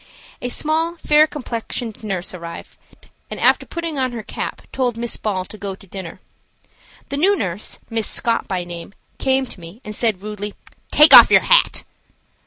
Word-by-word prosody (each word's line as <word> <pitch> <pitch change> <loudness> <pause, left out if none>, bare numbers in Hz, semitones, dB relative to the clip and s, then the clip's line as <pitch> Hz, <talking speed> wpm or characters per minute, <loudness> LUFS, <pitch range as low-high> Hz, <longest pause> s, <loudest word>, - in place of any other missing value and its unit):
A 245 - -3
small, 320 +5 -1
fair 305 -1 +4
complexioned 235 -5 -5
nurse 190 -4 -3
arrived, 170 -2 -9 0.5
and, - - -6
after - - +3
putting 335 -4 -4
on 255 -2 -1
her 230 -2 -5
cap, - - -6
told 245 -3 -1
Miss 235 0 -3
Ball 190 -4 -2
to 215 - -11
go 195 -2 -5
to 195 - -12
dinner. 185 -2 -8 0.9
The 280 - -3
new 385 +7 +4
nurse, 190 - -4
Miss 225 -2 -1
Scott 230 -1 +1
by 185 -2 -2
name, 175 +2 -9 0.2
came 265 0 +1
to 225 - -10
me 170 +5 -12
and 210 - -7
said, 215 -5 0
rudely: 210 -1 -5 0.4
"Take 300 +1 +7
off - - +11
your - - +6
hat." - - +3
225 Hz, 175 wpm, -20 LUFS, 190-270 Hz, 0.9 s, off